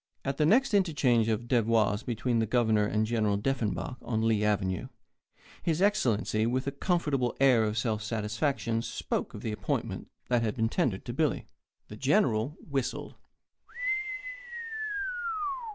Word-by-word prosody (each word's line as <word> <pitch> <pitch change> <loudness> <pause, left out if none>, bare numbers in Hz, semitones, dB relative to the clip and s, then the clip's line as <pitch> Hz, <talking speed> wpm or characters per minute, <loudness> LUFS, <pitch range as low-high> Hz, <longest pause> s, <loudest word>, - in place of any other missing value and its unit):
At 135 0 -1
the 150 - +3
next 250 +7 +4
interchange 145 - +3
of 115 +1 -1
devoirs 115 -4 +2
between 120 0 0
the 110 - +1
Governor 110 -3 +3
and 110 +1 +1
General 110 -3 +1
Deffenbaugh 125 +1 -2
on 110 -2 -1
Lee 110 -2 +2
Avenue, 95 -3 0 0.7
His 165 -1 0
Excellency, 120 - +2
with 130 +2 0
a 140 - -1
comfortable 140 -5 0
air 130 -4 +5
of 105 +1 -2
self 110 -1 0
satisfaction, 115 +2 -1
spoke - - -3
of - - -7
the 110 - -2
appointment 105 - -3 0.2
that 120 -1 +2
had 110 0 -1
been 115 -2 +1
tendered 120 - 0
to 120 - -4
Billy. 150 +2 0 0.4
The - - -9
General 110 +7 +2
whistled. 135 -4 -2
115 Hz, 140 wpm, -29 LUFS, 110-135 Hz, 0.7 s, air